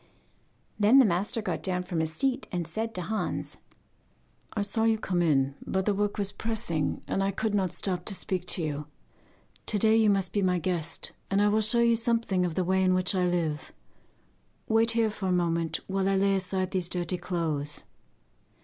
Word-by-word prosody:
Then 210 +6 +6
the 270 - +8
master 200 +4 0
got - - -2
down 180 -1 0
from 180 -2 -3
his 160 0 -1
seat 270 - -1
and 175 -2 -2
said 220 +7 -4
to 180 - 0
Hans: 215 +5 -3 1.0
'I 210 - -1
saw 220 +2 0
you 225 -1 +3
come 180 -4 -1
in, 140 -5 +2
but 190 0 -1
the 210 - +2
work 205 +1 -1
was 200 -1 +1
pressing, 210 -10 -2
and 195 - -1
I 195 - +1
could 205 +2 -2
not 190 -4 +1
stop 180 -1 -1
to 200 - +1
speak 185 -1 -2
to 175 - +1
you. 150 -1 -3 0.8
To 215 - +1
day 220 +2 +4
you 220 -1 +4
must 195 -3 +1
be 205 - +1
my 180 -1 +2
guest, 170 -1 -2 0.2
and 195 - +1
I 205 0 +4
will 215 +1 +2
show 230 +3 +3
you 235 0 +4
something 225 -5 +1
of 165 - -5
the 185 - +1
way 190 +1 +1
in 185 -1 +3
which 185 +1 +2
I 180 -1 +1
live. 165 -4 -2 1.0
Wait 225 +1 +3
here 225 -2 +2
for 200 -2 -4
a - - +1
moment, 170 -2 0
while 195 0 0
I 195 - +2
lay 195 0 +3
aside 185 0 -1
these 180 -3 0
dirty 180 0 -1
clothes. 160 -5 -3
190 Hz, 205 wpm, -28 LUFS, 175-210 Hz, 1.0 s, the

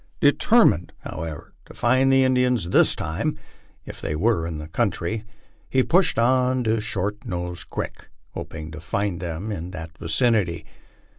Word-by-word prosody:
Determined, - - +4
however, 80 -3 -7
to - - -14
find 130 +2 +3
the 135 0 +5
Indians 125 -7 +2
this - - +4
time, 95 - -2 0.5
if - - -9
they 75 - -2
were 85 -1 +1
in 80 -2 -4
the 75 0 -7
country, 105 +2 -1 0.5
he 130 -1 +3
pushed 180 +5 +3
on 125 +1 +3
to 110 -1 +1
Short 105 +1 -3
Nose 90 -5 -4
creek, - - -6 0.2
hoping 80 0 -7
to 80 - -8
find 100 +1 -2
them 85 +4 -4
in 90 -3 -4
that 80 -3 -8
vicinity. 90 +1 +1
100 Hz, 150 wpm, -24 LUFS, 85-125 Hz, 0.5 s, the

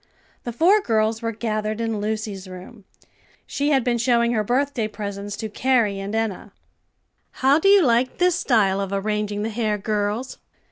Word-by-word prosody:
The 240 - -3
four 360 - +4
girls 220 - 0
were 230 0 -2
gathered 215 -1 -3
in 225 -2 -2
Lucy's 210 -2 -4
room. 185 +4 -11 0.6
She 285 +1 -1
had 270 -4 +3
been 240 -1 0
showing 235 -1 +2
her 220 -3 0
birthday 250 0 0
presents 205 -1 -6
to 220 - -4
Carrie 220 -3 +1
and 200 +2 -4
Enna. 225 -4 -3 0.8
"How 275 +3 +3
do 360 - +1
you 400 -2 +6
like 245 +1 +1
this 360 0 +3
style 200 - +2
of 195 -1 -4
arranging 210 +1 -2
the 220 - -2
hair, 215 -1 -1
girls?" 210 +4 -3
220 Hz, 170 wpm, -22 LUFS, 205-245 Hz, 0.8 s, you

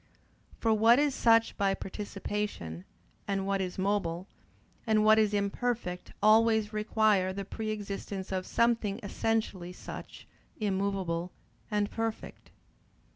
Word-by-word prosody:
For 225 -1 +2
what 225 +3 +6
is 290 -1 +2
such 230 -2 +4
by 195 -1 +2
participation, 195 - -5 0.4
and 195 -1 -1
what 195 0 0
is 180 -1 -4
mobile, 190 -2 -1 0.6
and 215 -1 +3
what 220 0 +7
is 215 -1 +3
imperfect 205 -2 -2
always 220 0 +4
requires 210 -3 +2
the 200 0 -4
pre 215 +2 -5
existence 200 -2 -5
of 185 -1 -2
something 230 -4 +1
essentially 200 -4 -1
such, - - -9 0.3
immovable 190 -4 -1 0.4
and 210 -1 0
perfect. 225 -1 -4
205 Hz, 120 wpm, -30 LUFS, 190-220 Hz, 0.6 s, what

